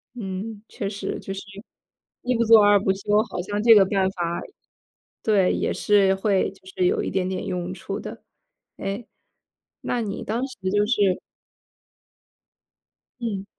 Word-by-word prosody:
嗯， 205 0 -5
确 200 -5 -4
实 200 0 -4
就 195 - -6
是 195 - -6 0.8
一 250 - -1
一 - - 0
不 230 - +3
做 220 -1 +8
二 205 0 +6
不 190 -1 +1
休， 205 +2 +1
好 180 - -3
像 205 +2 -3
这 230 -1 +8
个 200 -3 +7
办 190 -1 +1
法 175 -2 -3 0.8
对， 200 -4 +3
也 - - -1
是 195 -2 +3
会 195 -1 +1
就 - - -21
是 375 -1 -1
有 425 +3 +2
一 - - -3
点 185 -1 0
点 185 - -3
用 180 0 -3
处 - - -5
的。 - - -9 0.5
哎， 195 +4 -4 0.8
那 245 - -1
你 205 -1 -4
当 235 +5 -2
时 255 - -12
就 205 0 +3
是 200 -6 +2 2.0
嗯， 200 -5 -3
205 Hz, 170 characters per minute, -24 LUFS, 190-225 Hz, 2.0 s, 做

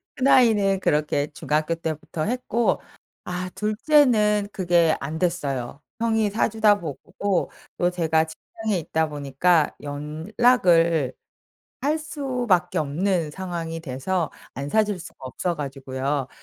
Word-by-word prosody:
큰 265 +1 +1
아이는 205 -7 +4
그렇게 150 -3 +1
중학교 155 +2 0
때부터 160 -1 -4
했고 240 -1 0 0.5
아 180 +1 -4
2 210 +2 -1
째는 215 -8 +4
그게 175 -3 +3
안됐어요. 145 -4 -2 0.2
형이 225 -2 +2
사 215 - +1
주다 215 -2 +3
보고 175 +5 -2 0.3
또 175 - +3
제가 160 -2 +1
직장에 210 +5 -4
있다 160 0 -1
보니까 150 +3 +1
연락을 165 - +2 0.7
할 300 +4 +1
수밖에 245 - 0
없는 160 +2 0
상황이 170 -3 -5
돼서 160 +4 -2 0.2
안 140 +1 -4
사 220 +6 +3
줄 205 -4 -4
수가 175 - -11
없어 165 +7 -3
가지고요. 135 -1 -3
175 Hz, 245 characters per minute, -24 LUFS, 150-210 Hz, 0.7 s, 아이는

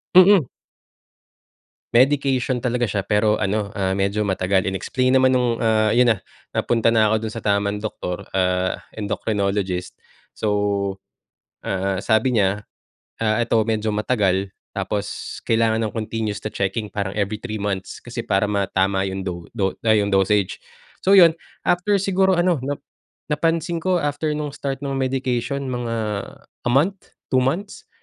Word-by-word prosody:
Mm. 185 - +7 1.5
Medication 130 -1 +3
talaga 125 0 -1
siya 105 -3 0
pero 105 0 +2
ano 100 +1 -1
ah, 95 -3 -1
medyo 100 +2 0
matagal 95 0 +1
in-explain 130 +7 0
naman 130 0 +5
nung 125 -2 +2
ah, 110 -1 +3
'yon 120 -1 +5
na 110 - 0 0.3
napunta 115 -1 +2
na 110 -2 +4
ako 110 - +2
dun 110 - -3
sa 115 - -5
tamang 100 -1 0
doctor 105 -4 -5
ah, 90 0 +1 0.2
endocrinologist, 100 -3 -2 0.4
so, 110 - -2 1.2
ah, 95 0 -1
sabi 115 +3 +2
niya 100 +1 +1 0.6
ah, 110 0 +2
ito 115 -1 +2
medyo 110 -1 -1
matagal, 100 -3 +1 0.2
tapos 100 +1 -4
kailangan 115 0 +2
ng 105 - -4
continues 110 -1 -3
to 110 - -3
checking, 105 +1 -2
parang 100 -2 -3
every 105 +1 -1
3 110 -2 -5
months 95 -2 -3
kasi 120 -1 -6
para 105 -1 +1
matama 95 -1 +1
'yong 95 0 -3
do 85 -2 -5
do 95 -5 -1
ah, 110 - +5
yung 105 -1 +2
dosage, 95 0 +2 0.5
so 195 - +5
'yon, 170 -4 +7 0.2
after 195 +3 +2
siguro 190 -1 +2
ano 175 -1 +2
na 145 +1 -3 0.5
napansin 165 +2 0
ko 180 +1 +1
after 145 +1 -1
nung 150 -1 -3
start 135 -1 -4
nung 135 -1 -2
medication 130 +1 -1
mga 120 -2 -3 0.7
a - - +2
month? 180 +9 0 0.2
2 130 - +5
months? 170 +11 -3
110 Hz, 150 wpm, -22 LUFS, 100-130 Hz, 1.5 s, Mm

